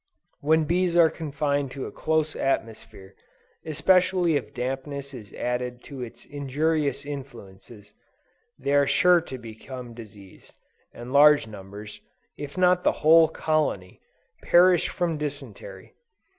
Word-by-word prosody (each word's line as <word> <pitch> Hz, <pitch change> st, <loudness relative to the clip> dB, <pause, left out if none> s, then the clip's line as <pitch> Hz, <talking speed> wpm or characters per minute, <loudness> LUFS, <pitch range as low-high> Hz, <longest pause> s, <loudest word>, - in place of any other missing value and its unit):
When 160 Hz, +2 st, +2 dB
bees 175 Hz, +2 st, +1 dB
are 165 Hz, -2 st, +6 dB
confined 145 Hz, -3 st, -2 dB
to 135 Hz, -, -5 dB
a -, -, -7 dB
close 155 Hz, -1 st, -1 dB
atmosphere, 110 Hz, -6 st, -3 dB, 0.5 s
especially 180 Hz, +1 st, +2 dB
if -, -, -3 dB
dampness 135 Hz, +2 st, -5 dB
is 110 Hz, -5 st, -10 dB
added 125 Hz, 0 st, -3 dB
to 140 Hz, -3 st, -9 dB
its 120 Hz, -2 st, -9 dB
injurious 145 Hz, +1 st, -1 dB
influences, 115 Hz, -7 st, -10 dB, 0.6 s
they 140 Hz, -, -2 dB
are 140 Hz, -1 st, +4 dB
sure 180 Hz, +3 st, +4 dB
to 135 Hz, -5 st, -8 dB
become 120 Hz, +1 st, -9 dB
diseased; 105 Hz, -4 st, -14 dB, 0.4 s
and 120 Hz, +2 st, -9 dB
large 145 Hz, 0 st, +6 dB
numbers, 105 Hz, 0 st, -10 dB, 0.3 s
if 145 Hz, +3 st, -8 dB
not 180 Hz, 0 st, +3 dB
the -, -, +3 dB
whole 160 Hz, +1 st, +7 dB
colony, 155 Hz, -, -2 dB, 0.4 s
perish 180 Hz, 0 st, +4 dB
from 170 Hz, -4 st, -2 dB
dysentery. 135 Hz, -10 st, -8 dB
140 Hz, 125 wpm, -25 LUFS, 120-160 Hz, 0.6 s, whole